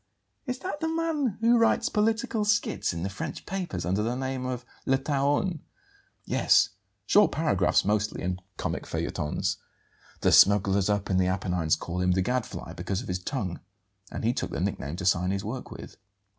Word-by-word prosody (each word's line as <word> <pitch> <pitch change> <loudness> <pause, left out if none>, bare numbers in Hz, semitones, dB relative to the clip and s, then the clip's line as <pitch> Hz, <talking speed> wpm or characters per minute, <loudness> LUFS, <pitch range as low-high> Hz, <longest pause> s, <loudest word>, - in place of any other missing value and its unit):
"Is 250 0 -2
that 330 +1 -5
the 320 - -1
man 320 - -1
who 235 +1 +5
writes 230 0 +3
political 220 0 +1
skits 210 0 +1
in 85 -1 -4
the - - 0
French 95 - -6
papers 175 - -3
under 95 +4 +1
the 115 +3 -1
name 130 0 -3
of 125 -1 -4 0.2
'Le 135 - +4
Taon'?" 145 +5 0 0.7
"Yes; - - +4 0.4
short 210 0 +5
paragraphs 100 - +2
mostly, 105 +1 0
and 90 +1 -2 0.2
comic - - -3
feuilletons. 75 - -2 0.6
The - - +3
smugglers 100 -1 +5
up 105 -1 0
in 95 - +2
the 95 -1 +3
Apennines 90 -4 +1
called 90 +1 -4
him 90 0 +3
'the 95 +1 +1
Gadfly' 125 +3 -3
because 100 +4 -3
of - - -9
his 90 0 -1
tongue; 95 -4 -3 0.5
and - - -5
he 115 +2 +2
took - - -3
the - - -4
nickname 70 +4 -2
to 95 +1 -5
sign 90 0 +3
his 100 0 -2
work 125 +4 -5
with." - - -10
110 Hz, 180 wpm, -27 LUFS, -, 0.7 s, who